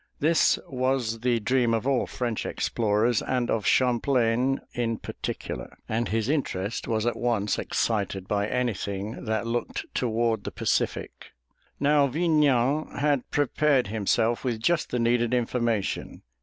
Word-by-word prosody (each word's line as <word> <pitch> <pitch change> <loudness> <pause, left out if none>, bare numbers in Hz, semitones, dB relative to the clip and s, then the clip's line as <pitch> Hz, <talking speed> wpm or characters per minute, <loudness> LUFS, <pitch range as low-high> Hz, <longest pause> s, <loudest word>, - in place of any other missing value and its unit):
This 160 +2 +4
was 130 -3 -1
the 120 0 +1
dream 120 +1 +2
of 115 - -2
all 135 -2 +1
French 120 -3 -3
explorers, 110 +1 +1
and 125 -2 -1
of 110 -3 0
Champlain 125 0 +2
in 115 -2 -1
particular, - - -6
and 115 +2 -1
his 110 0 0
interest 115 -9 -2
was 110 0 0
at 120 - +1
once 115 -4 0
excited 100 -4 -1
by 100 0 0
anything 110 -4 -3
that 110 0 -1
looked 120 +1 -2
toward 115 -1 0
the - - -3
Pacific. - - -2 0.5
Now 145 0 +4
Vignan 150 -2 +2
had 145 -3 +1
prepared 145 -3 +2
himself 110 +2 +1
with 120 -4 -1
just 160 +8 +1
the 125 - -1
needed 120 0 +2
information. 115 -4 -1
120 Hz, 135 wpm, -26 LUFS, 110-130 Hz, 0.5 s, This